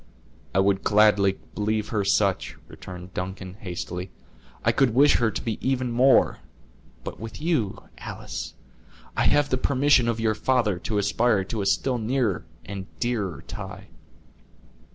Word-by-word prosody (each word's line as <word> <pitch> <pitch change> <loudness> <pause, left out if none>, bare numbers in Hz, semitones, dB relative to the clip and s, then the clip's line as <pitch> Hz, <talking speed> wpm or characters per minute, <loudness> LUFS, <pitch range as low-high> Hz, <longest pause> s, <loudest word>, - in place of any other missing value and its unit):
"I - - +3
would 95 0 +3
gladly 105 -2 +4 0.2
believe 105 0 -1
her 105 -3 0
such," 100 -1 +1
returned 90 0 -10
Duncan, 95 0 -5
hastily; 90 -2 -5 0.6
"I - - +5
could 130 -5 +2
wish 145 +3 +6
her 120 -2 +2
to 100 - -4
be 115 -2 -3
even 130 -2 0
more; 130 +3 +4 0.6
but - - -7
with 110 +1 -7
you, 150 - -1 0.2
Alice, - - -6 0.6
I - - +1
have 145 -1 +3
the 130 - +1
permission 135 -2 +3
of 115 -1 0
your 110 -1 +2
father 110 -5 +1
to 105 +3 -2
aspire 105 +1 +2
to 105 +2 -4
a 100 - -1
still 125 +5 +1
nearer 110 -6 0 0.2
and 95 -1 -6
dearer 105 - -2
tie." - - -8
110 Hz, 150 wpm, -25 LUFS, 95-125 Hz, 0.6 s, wish